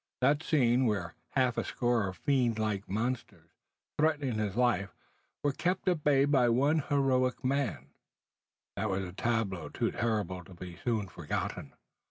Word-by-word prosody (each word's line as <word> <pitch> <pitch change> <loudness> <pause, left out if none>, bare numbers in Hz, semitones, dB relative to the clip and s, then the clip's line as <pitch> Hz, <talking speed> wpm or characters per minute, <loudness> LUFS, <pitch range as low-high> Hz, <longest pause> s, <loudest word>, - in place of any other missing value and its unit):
That 145 +4 +3
scene, 130 -5 +3
where 90 -7 -1 0.2
half 130 -3 +2
a - - 0
score 120 -4 0
of 95 -1 -6
fiend 125 - +1
like 105 -3 -2
monsters, 105 -6 -3 0.5
threatening 145 -7 +1
his 105 -2 -1
life, 120 -5 +1 0.5
were 145 - +3
kept 180 +7 -1
at 175 -5 +1
bay 140 -2 +4
by 135 -4 +4
one 140 +7 +3
heroic 135 -3 +1
man, 130 - -1 0.8
that 110 - -1
was 95 0 -1
a 90 -1 -7
tableau 100 -4 -1
too - - -1
terrible 105 -6 -1
to 90 - -13
be 90 0 -8
soon 110 -5 0
forgotten. 90 - -4
120 Hz, 155 wpm, -31 LUFS, 100-135 Hz, 0.8 s, bay